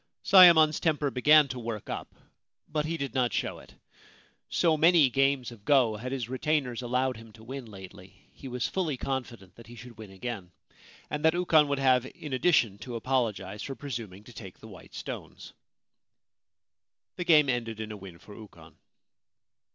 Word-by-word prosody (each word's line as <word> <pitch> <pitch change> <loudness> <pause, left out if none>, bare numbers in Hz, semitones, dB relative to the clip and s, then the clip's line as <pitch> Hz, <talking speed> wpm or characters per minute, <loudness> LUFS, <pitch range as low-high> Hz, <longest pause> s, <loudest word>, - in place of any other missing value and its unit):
Sayemon's 170 -5 +7
temper 150 -3 0
began 150 +4 +5
to 125 - -5
work 115 -3 -6
up; - - -7 0.5
but 150 -1 -2
he 165 +1 -3
did 140 -3 -5
not 125 -4 +1
show - - -3
it. - - -17 0.7
So 165 -3 +2
many 160 -3 +4
games 135 -1 +1
of 110 -4 -14
go 125 -4 +3
had 125 +4 -6
his 130 -4 -3
retainers 130 -1 -1
allowed 125 +1 -1
him 115 0 -13
to 110 - -16
win 130 +2 -7
lately, 95 -2 -14
he 135 - -11
was 125 -1 -2
fully 165 -8 -2
confident 120 -8 -5
that 115 - -14
he 120 - -12
should 120 -2 -13
win 110 -2 -10
again, 95 -2 -7 0.6
and 150 0 -3
that 160 +1 +4
Ukon 160 -4 +3
would 140 0 -1
have 130 -2 +2
in 150 -3 -8
addition 125 - +2
to 120 +3 -7
apologise 115 -4 -2
for 135 - -6
presuming 115 -9 -7
to 120 - -15
take 95 -5 -11
the 110 - -14
white 95 -6 -14
stones. - - -8 1.6
The 180 - -2
game 155 -5 +5
ended 115 -4 -2
in 110 -1 -5
a - - -6
win 95 -4 -11
for 105 - -15
Ukon. 85 -7 -15
125 Hz, 175 wpm, -28 LUFS, 110-145 Hz, 1.6 s, Sayemon's